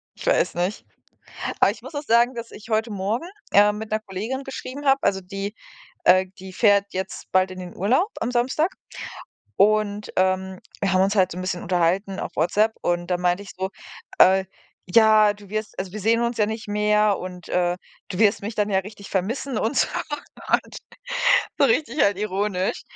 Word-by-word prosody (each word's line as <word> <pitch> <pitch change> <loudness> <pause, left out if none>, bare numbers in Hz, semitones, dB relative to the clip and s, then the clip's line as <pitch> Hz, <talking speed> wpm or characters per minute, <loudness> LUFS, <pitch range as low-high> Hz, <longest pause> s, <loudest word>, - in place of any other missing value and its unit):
ich - - -10
weiß - - +3
nicht. 180 +4 -2 0.8
Aber - - +6
ich - - -8
muss - - -10
auch 290 - -3
sagen, 240 0 +3
dass 235 0 -7
ich 220 +2 -12
heute 220 +1 +1
Morgen, 210 - -2 0.2
ähm, 205 +1 +5
mit 220 0 -7
'ner 215 - +1
Kollegin 220 +7 -4
geschrieben 270 +1 -7
habe, 270 0 +4
also 190 -1 +1
die, 195 +3 -5 0.5
äh 185 +1 +5
die 190 0 -9
fährt 200 -1 +4
jetzt 190 +1 -5
bald 185 0 +2
in 185 - -8
den 180 -1 -9
Urlaub 255 - +2
am 245 +2 -1
Samstag. 265 +9 +1 0.8
Und, 210 0 +2
ähm, 185 0 +1 0.2
wir 195 -2 +1
haben 185 0 +4
uns 195 +2 +2
halt 185 -2 +3
so 175 - -7
'n - - -4
bisschen 185 -1 -3
unterhalten 185 +3 0
auf - - -4
WhatsApp 210 +8 +2
und 175 0 -1
da 180 - +1
meinte 180 +2 +1
ich 200 - -11
so, 190 0 -2 0.5
äh: 190 +1 +6 0.4
„Ja, 215 +1 +5
du 205 -1 -15
wirst 215 -1 -4
also, 190 -1 -4
wir 215 - -5
sehen 230 +3 +2
uns 235 -1 -1
ja 210 - +3
nicht 220 0 -5
mehr 210 -1 +2
und, 180 -1 -8
äh, 175 0 +1 0.3
du 180 - -5
wirst 210 -2 +3
mich 215 +2 -4
dann 210 0 +1
ja 190 - +3
richtig 200 +1 -11
vermissen 225 +6 -2
und 225 +6 -1
so - - +4 0.7
und“, - - +1 0.8
so - - +5
richtig 305 - +1
halt 200 -1 +3
ironisch. 200 -2 -1
205 Hz, 195 wpm, -23 LUFS, 185-220 Hz, 0.8 s, Aber